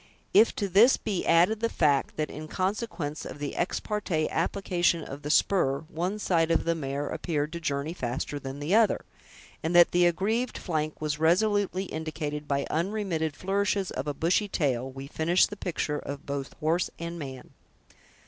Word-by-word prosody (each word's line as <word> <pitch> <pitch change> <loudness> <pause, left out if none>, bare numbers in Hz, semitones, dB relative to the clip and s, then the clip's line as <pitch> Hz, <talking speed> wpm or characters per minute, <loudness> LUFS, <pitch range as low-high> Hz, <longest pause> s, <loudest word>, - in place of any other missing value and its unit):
If 215 +3 +6
to 200 - -1
this 210 +8 +6
be 200 -4 -3
added 175 +6 +4
the 230 0 0
fact 145 -8 +1
that, 155 -1 -2
in 155 +1 -7
consequence 185 -5 -2
of - - -7
the 145 -1 -4
ex - - -1
parte 180 -7 -1
application 175 -1 +1
of 140 0 -8
the 150 - -5
spur, 145 -4 +3
one 180 +6 -2
side 170 -5 +1
of 165 - +2
the 170 - +2
mare 145 -2 -3
appeared 150 -2 -2
to 170 - -4
journey 145 0 -2
faster 130 0 -3
than 135 0 -6
the 145 +6 -2
other; 220 0 +3 0.6
and 165 +2 -1
that 175 -1 +7
the 175 0 +4
aggrieved 220 +8 0
flank 155 -3 -2
was 150 -1 -2
resolutely 190 +3 +2
indicated 150 -3 -4
by 140 0 0
unremitted 170 -4 -1
flourishes 195 +1 0
of 130 +3 -4
a 145 - -2
bushy 180 +6 +2
tail, 135 -9 0
we 135 +1 -8
finish 160 +5 +3
the 205 - -7
picture 155 -6 -2
of 140 0 -7
both 140 -1 -4
horse 165 +3 +1
and 170 0 -5
man. 135 -3 -8
165 Hz, 175 wpm, -28 LUFS, 145-190 Hz, 0.6 s, that